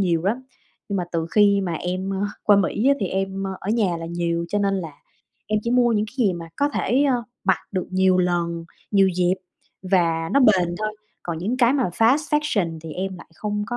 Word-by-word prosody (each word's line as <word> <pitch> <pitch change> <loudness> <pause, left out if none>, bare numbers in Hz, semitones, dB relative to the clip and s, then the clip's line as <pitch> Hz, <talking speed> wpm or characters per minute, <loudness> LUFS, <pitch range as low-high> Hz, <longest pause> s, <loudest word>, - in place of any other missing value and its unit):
nhiều 170 -4 +1
lắm, 235 +6 0 0.5
nhưng 200 - -1
mà 180 - -1
từ 165 -1 -1
khi 200 -1 +4
mà 180 -3 -2
em, 185 +3 -3
ơ, 195 - -2 0.2
qua 205 -1 +5
Mỹ 205 +6 +1
á, 280 - +5
thì 195 - 0
em, 195 0 -2
ơ, - - -3
ở 200 - -3
nhà 205 -7 +1
là 165 - -6
nhiều. 170 0 -1
Cho 205 - 0
nên 200 -1 +1
là 165 -6 -4 0.5
em 215 0 +1
chỉ 235 - -2
mua 245 -1 +4
những 210 0 +1
cái 210 - -14
gì 190 - +2
mà 170 -1 -7
có 285 - +2
thể, 265 0 +1
a, 270 -3 +3 0.3
mặc 190 -1 +3
được 185 -2 -2
nhiều 185 0 +3
lần, 170 -2 0 0.3
nhiều 195 -2 +4
dịp 180 0 +1 0.6
và 165 -2 +2
nó 280 - +4
bền 185 -8 +4
thôi, 215 0 -3 0.3
còn 170 -2 -4
những 215 +9 -2
cái 245 0 +4
fast 230 - +3 0.2
fashion 185 - -1
thì 160 -2 -7
em 190 +1 -4
lại - - -13
không 210 +2 -3
có 240 - -3
190 Hz, 225 wpm, -23 LUFS, 175-215 Hz, 0.6 s, qua